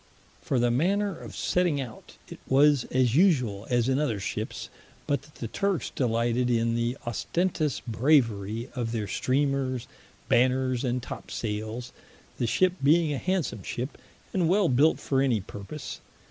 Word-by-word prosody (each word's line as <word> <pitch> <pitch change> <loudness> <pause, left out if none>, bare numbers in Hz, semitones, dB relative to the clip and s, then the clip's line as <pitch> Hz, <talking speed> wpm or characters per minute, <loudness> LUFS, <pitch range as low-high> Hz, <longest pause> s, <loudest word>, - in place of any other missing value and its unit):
For 135 - -1
the 120 0 +3
manner 195 +9 +1
of - - -10
setting 175 -5 +1
out, 120 -5 -8
it - - -10
was 140 -1 +4
as 125 -3 +1
usuall 125 - +2
as 120 -1 +2
in 135 +1 +2
other 120 -9 0
ships, - - -4 0.4
but 140 -3 0
that 145 +1 -20
the 115 - -5
Turkes 195 - -1
delighted 120 0 +1
in 115 -1 +2
the 120 +2 -1
ostentous 155 +4 -1
braverie 115 -3 +1
of 120 -3 -3
their 110 -3 -2
Streamers, 130 -1 0 0.4
Banners, 130 0 +2
and 125 -1 -1
Top - - -8
sayles; 110 +3 -4 0.5
the 120 - +1
ship 185 +9 +3
being 155 +2 +4
a 135 - -2
handsome 180 - -1
ship, 125 +8 -4 0.4
and 175 -4 +2
well 190 -1 +3
built 140 +6 +4
for 135 -1 0
any 125 -5 +2
purpose. 100 +9 -8
130 Hz, 155 wpm, -27 LUFS, 115-150 Hz, 0.5 s, was